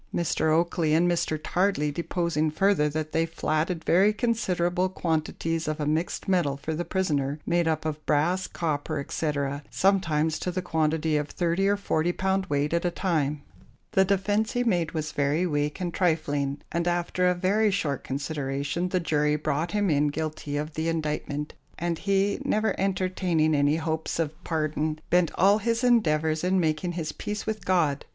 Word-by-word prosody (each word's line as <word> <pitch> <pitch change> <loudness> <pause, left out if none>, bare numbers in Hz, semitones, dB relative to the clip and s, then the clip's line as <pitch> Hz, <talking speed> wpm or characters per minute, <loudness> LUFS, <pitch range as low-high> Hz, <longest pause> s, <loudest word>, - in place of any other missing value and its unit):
Mr. 160 -2 0
Oakley 165 -1 +2
and 170 +2 +4
Mr. 170 -2 0
Tardley 175 -3 0
deposing 170 -1 0
further, 155 -1 +2
that 155 +1 -3
they 165 0 +1
flatted 165 +1 -1
very 195 +5 +5
considerable 185 -6 0
quantities 165 -1 -2
of 155 0 -2
a 150 - -1
mixed 155 +4 -1
metal 170 -8 +1
for 160 +3 -4
the 165 +3 -2
prisoner, 150 -6 -1
made 170 -1 +1
up 160 -1 0
of 155 -1 -3
brass, 165 +5 +1
copper, 155 -2 -2
etc., 140 -1 -2
sometimes 160 -5 +1
to - - -2
the 180 0 -3
quantity 160 -2 +1
of 145 0 -2
30 175 +2 0
or 205 0 +2
40 175 -3 0
pound 190 +1 0
weight 145 +2 0
at 170 - +1
a 175 - +2
time. 150 -6 -1 0.5
The 190 - +4
defence 205 +3 +1
he 245 - +1
made 175 -8 0
was 155 -1 -3
very 145 +5 +1
weak 150 0 -1
and 175 -2 -3
trifling, 145 -5 0
and 170 +1 -1
after 175 +1 +1
a 180 - +3
very 200 +4 +2
short 155 -9 -1
consideration 140 +4 -2
the 185 - +1
jury 150 -3 +1
brought 155 +3 -1
him 205 -4 +1
in 145 0 +3
guilty 150 -1 -3
of 150 +1 -4
the 160 +1 -1
indictment, 150 -2 -3 0.2
and 170 -1 -2
he, 200 0 +1
never 215 +1 +1
entertaining 185 -4 +1
any 145 +1 +3
hopes 160 0 -2
of 160 -2 -1
pardon, 155 -1 -1
bent 175 -2 +4
all 200 +4 +4
his 230 +3 0
endeavours 160 -10 +2
in 185 +1 +2
making 165 +1 0
his 160 -3 -3
peace 210 +6 -5
with 215 -3 -4
God. 160 -7 +2
165 Hz, 175 wpm, -26 LUFS, 150-185 Hz, 0.5 s, very